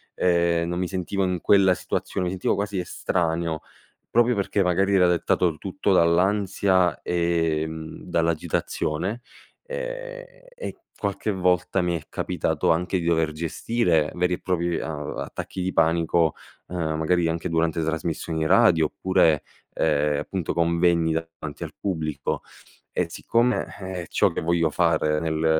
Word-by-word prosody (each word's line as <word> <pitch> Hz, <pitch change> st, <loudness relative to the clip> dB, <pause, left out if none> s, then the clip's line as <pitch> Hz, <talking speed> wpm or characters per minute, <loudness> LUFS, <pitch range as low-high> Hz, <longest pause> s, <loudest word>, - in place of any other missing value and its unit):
ehm, 85 Hz, -1 st, +2 dB
non 90 Hz, +1 st, -2 dB
mi 90 Hz, -, 0 dB
sentivo 95 Hz, +1 st, -2 dB
in 90 Hz, -2 st, 0 dB
quella 95 Hz, -2 st, +5 dB
situazione, 90 Hz, -, -3 dB
mi 90 Hz, -, -1 dB
sentivo 90 Hz, -, 0 dB
quasi 100 Hz, -1 st, -2 dB
estraneo, 85 Hz, -2 st, -1 dB, 0.5 s
proprio 120 Hz, +1 st, +3 dB
perché 100 Hz, 0 st, +1 dB
magari 95 Hz, +2 st, +2 dB
era 90 Hz, -2 st, +5 dB
dettato 85 Hz, -1 st, +1 dB
tutto 95 Hz, 0 st, -1 dB
dall'ansia, 95 Hz, +1 st, +3 dB
ehm, 80 Hz, -2 st, -1 dB
dall'agitazione. 85 Hz, +3 st, -1 dB, 0.4 s
Ehm, -, -, -5 dB, 0.3 s
e -, -, -6 dB, 0.2 s
qualche 100 Hz, +1 st, -2 dB
volta 90 Hz, 0 st, +1 dB
mi 90 Hz, -1 st, 0 dB
è 80 Hz, -, -8 dB
capitato -, -, 0 dB
anche 90 Hz, +3 st, 0 dB
di 85 Hz, -, -4 dB
dover 80 Hz, -2 st, +2 dB
gestire 80 Hz, +1 st, 0 dB
veri 90 Hz, 0 st, +1 dB
e -, -, -2 dB
propri 85 Hz, -2 st, 0 dB
a 75 Hz, -2 st, -4 dB
attacchi 95 Hz, -, -6 dB
di 95 Hz, +1 st, -1 dB
panico, 80 Hz, 0 st, +2 dB, 0.3 s
ehm 80 Hz, -3 st, -2 dB
magari 85 Hz, +2 st, +2 dB
anche 80 Hz, 0 st, -2 dB
durante 85 Hz, 0 st, +1 dB
trasmissioni 80 Hz, 0 st, -2 dB
radio, 90 Hz, -4 st, +5 dB
oppure, 80 Hz, -5 st, +2 dB, 0.3 s
ehm, 75 Hz, -1 st, +1 dB
appunto 95 Hz, -4 st, -3 dB
convegni 85 Hz, -1 st, +2 dB
davanti 80 Hz, -2 st, -5 dB
al -, -, -6 dB
pubblico. 75 Hz, -7 st, -2 dB, 0.5 s
E -, -, 0 dB
siccome, 120 Hz, +2 st, +1 dB, 0.2 s
eh, 95 Hz, -1 st, -4 dB
è -, -, -11 dB
ciò -, -, +2 dB
che -, -, -3 dB
voglio 85 Hz, -1 st, +2 dB
fare 75 Hz, +1 st, +2 dB
nel 80 Hz, 0 st, +1 dB
85 Hz, 140 wpm, -24 LUFS, 80-95 Hz, 0.5 s, quella